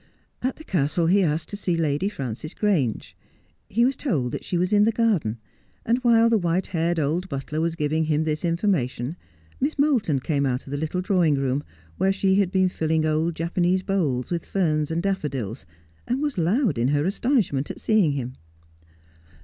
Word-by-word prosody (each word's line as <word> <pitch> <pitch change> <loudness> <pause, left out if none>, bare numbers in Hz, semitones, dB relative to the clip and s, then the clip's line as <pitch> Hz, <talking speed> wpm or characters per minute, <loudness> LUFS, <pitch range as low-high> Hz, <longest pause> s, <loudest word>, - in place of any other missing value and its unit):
At 255 +2 -1
the 315 - -12
castle 165 - 0
he 190 +4 +4
asked 160 -2 0
to - - -5
see 180 -4 -1
Lady 160 +4 0
Frances 135 - -6
Grange. 165 - 0 0.5
He 235 +4 +3
was 265 +1 +1
told 145 - -1
that - - -5
she 180 - -2
was 180 +3 0
in 205 0 +5
the 225 - +3
garden, 205 - +1 0.5
and 235 +2 +2
while 230 -2 +4
the 230 -2 +3
white 175 +1 0
haired 170 0 -1
old 165 +6 -1
butler 140 +2 -3
was 165 0 0
giving 155 0 0
him 155 0 +1
this 155 +1 -2
information 165 - 0 0.4
Miss 290 +4 -1
Moulton 255 - +2
came 140 +1 0
out 130 -2 -1
of 135 - -10
the 145 - -2
little 160 +4 -2
drawing 180 -5 +2
room, 135 +1 -1 0.3
where 190 - +2
she 195 0 +2
had 190 -3 +1
been 190 -1 +3
tilling 160 -2 0
old 155 +2 0
Japanese 175 +3 0
bowls 150 -11 -1
with 170 -2 -1
ferns 155 -6 0
and 165 +1 -1
daffodils, 140 - -3 0.4
and 250 +2 0
was 290 -2 -1
loud 185 - +1
in 120 - +2
her 145 +2 +1
astonishment 195 - 0
at - - -6
seeing 205 -9 +2
him. 130 -2 -4
170 Hz, 190 wpm, -24 LUFS, 145-195 Hz, 0.5 s, in